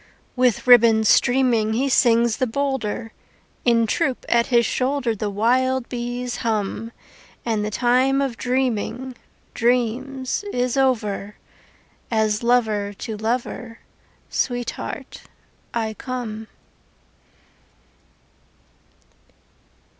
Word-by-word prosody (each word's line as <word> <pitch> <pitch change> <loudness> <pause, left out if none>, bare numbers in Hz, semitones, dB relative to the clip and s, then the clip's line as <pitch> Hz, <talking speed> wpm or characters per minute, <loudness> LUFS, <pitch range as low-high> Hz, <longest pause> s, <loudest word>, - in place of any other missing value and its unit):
With 250 -4 +2
ribbons 230 -3 +6
streaming 240 -4 +3
He 260 +5 +1
sings 235 -3 +3
the 255 - 0
bolder; 240 -3 -2 0.5
In 230 -2 +4
troop 265 +3 -1
at 235 0 +2
his 235 -3 +3
shoulder 255 -2 0
The 210 0 -3
wild 250 +5 +1
bees 245 0 -4
hum. 220 0 -2 0.5
And 220 -3 0
the 210 - -2
time 255 +4 +2
of 270 -4 -1
dreaming 250 0 -2 0.4
Dreams 250 - 0
is 250 0 -1
over 215 -6 0 0.7
As 215 -2 +1
lover 220 -4 +1
to 215 +2 -6
lover, 230 +1 -3 0.5
Sweetheart, 245 -2 -4 0.5
I 220 -2 -2
come. 225 -2 -6
240 Hz, 95 wpm, -22 LUFS, 220-255 Hz, 0.7 s, ribbons